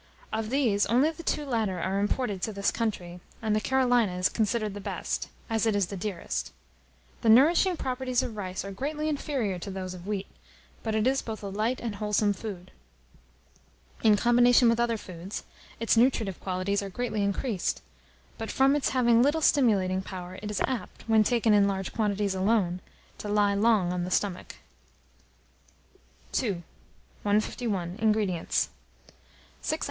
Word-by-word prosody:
Of 220 -1 -2
these, 235 -6 +2
only 255 +8 +3
the 325 - -10
two 300 -2 -1
latter 220 -8 -1
are 190 +3 -1
imported 205 -1 -1
to 220 - -1
this 200 -1 0
country, 180 -6 -3 0.2
and 215 -2 0
the 215 - +1
Carolina 245 -7 +2
is 180 - +2
considered 215 -1 0
the 205 - -7
best, - - -3 0.2
as 225 -1 0
it 215 - +2
is 200 -2 +2
the 200 - -7
dearest. 175 - -4 0.7
The 225 - +2
nourishing 330 - +5
properties 255 -2 -1
of 225 - -5
rice 190 -2 -4
are 195 - -5
greatly 295 +9 -3
inferior 270 - -1
to 195 - -6
those 190 -1 -5
of 180 +1 -10
wheat; 200 -2 -2 0.6
but 220 -1 -2
it 215 0 +1
is 270 +1 +2
both 220 -2 -6
a 200 - -4
light 215 +6 -1
and 230 -3 -3
a - - -9
wholesome 210 0 +1
food. 190 -3 -8 1.3
In 215 -2 +5
combination 240 +1 +5
with 230 0 +2
other 235 -1 +1
foods, 185 0 -7 0.4
its 230 0 +2
nutritive 225 -5 +2
qualities 190 +2 -1
are 200 - -5
greatly 220 +1 -2
increased; 200 0 -1 0.6
but 225 - -4
from 270 +1 +3
its 290 - +1
having 240 -3 +4
little 290 +5 +3
stimulating 200 -11 +3
power, 185 -1 -8
it 210 - -5
is 210 - -2
apt, 245 -8 -5
when 220 -1 +5
taken 230 -1 +2
in 200 -1 +5
large 195 -1 -3
quantities 205 -3 0
alone, 190 -2 +1 0.4
to 210 - -5
lie 205 -1 +3
long 200 -4 +3
on 180 -1 -2
the 180 - -3
stomach. 185 -1 -1 1.9
II. 195 -9 -2 0.6
151. 205 -3 -1
INGREDIENTS. 210 -6 +1 0.9
6 - - -1
oz. - - -2
210 Hz, 165 wpm, -28 LUFS, 195-240 Hz, 1.9 s, nourishing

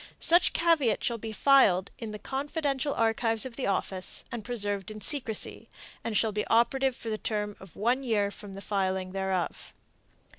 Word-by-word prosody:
Such 345 +2 +5
caveat 315 -10 +2
shall 235 -1 -1
be 220 +1 -5
filed 210 -7 +4
in 225 - -5
the 210 - -6
confidential 280 +2 -2
archives 225 0 +1
of 255 -3 -7
the 270 - -2
office 190 -1 -2
and 235 -3 -5
preserved 205 -4 -2
in 215 0 -7
secrecy, 230 -3 0 0.3
and 220 -3 -1
shall 220 +1 +2
be 210 0 -1
operative 260 +3 +3
for 230 - -6
the 215 - -2
term 210 -1 -2
of 190 -2 -14
one 240 +6 +1
year 210 -6 +1
from 200 -1 -9
the 195 - -8
filing 190 -2 -1
thereof. 190 -2 -3
220 Hz, 175 wpm, -29 LUFS, 200-260 Hz, 0.3 s, Such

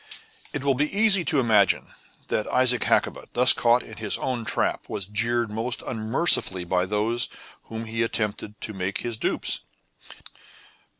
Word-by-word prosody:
It - - -4
will 140 -1 +2
be 145 +4 0
easily 200 -2 +3 0.2
imagined 110 -6 +2 0.4
that 105 - -1
Isaac 125 -1 +3
Hakkabut, - - 0
thus 125 +1 +8
caught 120 +1 +2
in 110 - -12
his 110 -2 -1
own 125 -3 -3
trap, - - -2
was 100 - -3
jeered 115 +3 -1
most 115 +4 -3
unmercifully 110 - +2
by 90 +1 -1
those 110 +4 -1 0.4
whom 115 0 -7
he 115 +1 -3
had 115 - +2
attempted 105 -1 -4
to 110 - -5
make 95 0 -4
his 120 -1 -3
dupes. - - 0
115 Hz, 155 wpm, -24 LUFS, 105-125 Hz, 0.4 s, thus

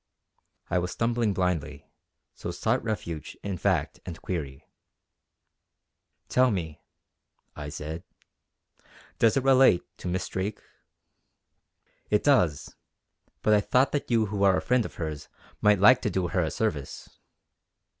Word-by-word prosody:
I 90 - +3
was 90 +1 -2
stumbling 115 +2 0
blindly, 85 -6 -2 0.5
so - - -6
sought 110 +8 0
refuge 85 -8 -5
in 95 -4 -4
fact - - 0
and 85 -3 -8
query, 70 -7 -5 1.6
"Tell 130 0 +3
me" 85 -8 -4 0.7
I 75 -1 -6
said 80 +3 -6 1.2
"does 115 +2 +4
it 135 - +1
relate 130 -9 +5 0.2
to - - -6
Miss 90 +1 -2
Drake?" 95 +3 -3 1.5
"It 105 - +2
does; 90 - +2 0.7
but 110 - +4
I 105 - +5
thought 125 +6 +2
that 145 - -2
you 115 -2 +3
who 100 -1 -4
are 95 -2 +5
a - - -1
friend 125 -2 +2
of - - -8
hers 80 -3 -5 0.3
might 105 0 +5
like 120 +6 +7
to - - 0
do 90 -2 -1
her 90 - +1
a 80 - 0
service." 75 -11 -4
95 Hz, 135 wpm, -27 LUFS, 85-115 Hz, 1.6 s, like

